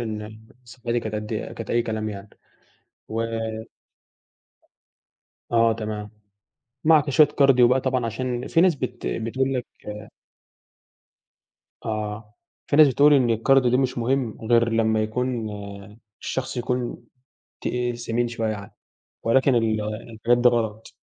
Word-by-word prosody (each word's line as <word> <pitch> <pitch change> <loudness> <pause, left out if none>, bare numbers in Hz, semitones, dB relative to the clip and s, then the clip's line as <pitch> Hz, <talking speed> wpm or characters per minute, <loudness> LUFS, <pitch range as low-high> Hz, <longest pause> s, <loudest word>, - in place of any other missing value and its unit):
إن 110 -1 -6 0.2
صحتي 120 0 -3
كانت 110 -1 -5
قد 105 +1 -4
كانت 115 +1 -5
أي 120 - +2
كلام 110 -2 -3
يعني 100 -1 -8 0.8
و 115 +1 -2 2.3
آه 115 -1 +4
تمام، 105 -1 -5 0.7
معاك 155 -2 +4
شويّة 150 +2 +6
كارديو 135 -4 +5
بقى 130 +1 +2
طبعًا 130 -2 0
عشان 125 +2 -3
في 165 - +3
ناس 180 -3 +4
بت 125 -3 -4
بتقول 130 +4 -1
لك 125 -2 -2 2.2
آه، 105 0 -4 0.3
في 145 - +1
ناس 155 -1 +8
بتقول 145 +3 +5
إن 130 -4 +3
الكارديو 125 +3 +3
ده 125 - +3
مش 130 -2 0
مهم 120 -1 -1
غير 115 0 +5
لمّا 110 -1 +2
يكون 115 0 -2 0.7
الشخص 130 0 -3
يكون 125 -1 -3 0.6
تقيل 120 -1 -2
سمين 120 0 -1
شويّة 115 -1 -3
يعني 100 -2 -8 0.5
ولكن 130 +3 +3
ال 110 -2 +1
الحاجات 110 +2 -1
دي 120 0 +6
غلط. 110 -3 -2
120 Hz, 130 wpm, -24 LUFS, 110-130 Hz, 2.3 s, ناس